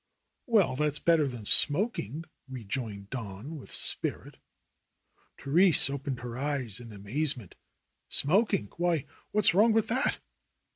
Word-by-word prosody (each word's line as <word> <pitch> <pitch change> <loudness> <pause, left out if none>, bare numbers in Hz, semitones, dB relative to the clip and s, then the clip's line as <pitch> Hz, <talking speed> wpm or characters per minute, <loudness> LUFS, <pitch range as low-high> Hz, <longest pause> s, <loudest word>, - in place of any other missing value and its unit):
"Well, 210 - +3
that's 150 +1 0
better 165 -3 +2
than 120 -5 -7
smoking," 155 - +2 0.2
rejoined 110 -4 -6
Don 115 +4 -7
with 135 - -12
spirit. - - -4 1.0
Therese 160 +1 +4
opened 140 -2 -4
her 120 0 -6
eyes 135 -7 -1
in 120 -2 -11
amazement. 115 - -2 0.6
"Smoking! 170 - +1
Why, 170 -4 0 0.3
what's 210 -4 +4
wrong 215 +5 +4
with 225 -1 +1
that 260 +5 +1
140 Hz, 115 wpm, -29 LUFS, 120-170 Hz, 1.0 s, Therese